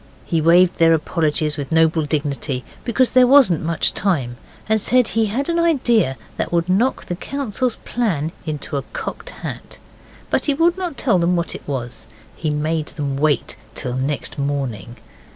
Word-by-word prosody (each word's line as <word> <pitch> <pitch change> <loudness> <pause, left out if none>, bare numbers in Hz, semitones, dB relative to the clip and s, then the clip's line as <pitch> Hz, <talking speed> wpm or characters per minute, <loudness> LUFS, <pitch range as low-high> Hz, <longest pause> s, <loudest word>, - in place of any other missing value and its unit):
He 165 -3 0
waived 175 +3 +5
their 165 0 +6
apologies 155 -1 0
with 145 +1 -5
noble 160 -1 +3
dignity, 140 -3 -2 0.2
because 250 +1 +2
there 255 -1 +6
wasn't 255 - +5
much 165 0 +1
time, 135 -12 0 0.3
and 220 0 +2
said 250 +1 +3
he 225 -1 +1
had 255 +7 -2
an 340 0 0
idea 240 - +2 0.2
that - - -2
would 170 0 +1
knock 215 +8 +1
the 175 - -3
council's 255 +1 -3
plan 170 -11 -1
into 150 -2 -4
a - - -1
cocked - - -5 0.2
hat. - - -7 0.5
But - - +1
he 285 - +1
would 335 +3 +3
not 360 -6 -4
tell 225 -9 +2
them 175 +1 +2
what 170 -1 -1
it - - -10
was. 120 -5 -5 0.3
He 155 - -2
made 155 +1 -1
them 140 -3 -4
wait 145 -2 0 0.2
till 125 -2 -3
next 135 +3 -2
morning. 130 -6 -3
165 Hz, 170 wpm, -20 LUFS, 145-230 Hz, 0.5 s, their